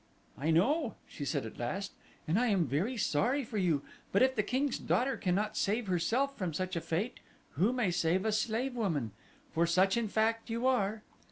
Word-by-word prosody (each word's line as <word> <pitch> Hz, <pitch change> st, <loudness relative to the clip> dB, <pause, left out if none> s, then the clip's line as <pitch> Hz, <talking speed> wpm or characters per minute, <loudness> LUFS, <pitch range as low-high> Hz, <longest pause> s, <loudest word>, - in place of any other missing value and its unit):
"I 150 Hz, +4 st, -2 dB
know," 240 Hz, -, +2 dB
she 145 Hz, -, -7 dB
said 135 Hz, -, -1 dB
at 110 Hz, -, -9 dB
last, 190 Hz, +12 st, -3 dB, 0.4 s
"and 170 Hz, +7 st, +2 dB
I 250 Hz, -, +2 dB
am 195 Hz, -6 st, +3 dB
very 170 Hz, -, -1 dB
sorry 240 Hz, -, +1 dB
for 220 Hz, -3 st, -3 dB
you; 165 Hz, -7 st, +1 dB, 0.3 s
but 200 Hz, -, +4 dB
if 260 Hz, 0 st, +3 dB
the 210 Hz, -, +3 dB
king's 260 Hz, +6 st, -1 dB
daughter 265 Hz, +2 st, +1 dB
cannot 205 Hz, +2 st, 0 dB
save 220 Hz, +4 st, 0 dB
herself 225 Hz, +10 st, +1 dB
from 180 Hz, -, -3 dB
such 185 Hz, +1 st, -2 dB
a 170 Hz, -, -1 dB
fate 195 Hz, +12 st, -2 dB, 0.3 s
who 190 Hz, -, +2 dB
may 245 Hz, -7 st, +1 dB
save 175 Hz, +3 st, +1 dB
a 220 Hz, -, +2 dB
slave 235 Hz, +4 st, 0 dB
woman? 160 Hz, -, -1 dB, 0.4 s
for 170 Hz, +1 st, +2 dB
such 185 Hz, +5 st, +3 dB
in 235 Hz, -2 st, 0 dB
fact 225 Hz, +2 st, 0 dB
you 230 Hz, +2 st, -2 dB
are." 220 Hz, -4 st, +1 dB
205 Hz, 195 wpm, -32 LUFS, 170-240 Hz, 0.4 s, but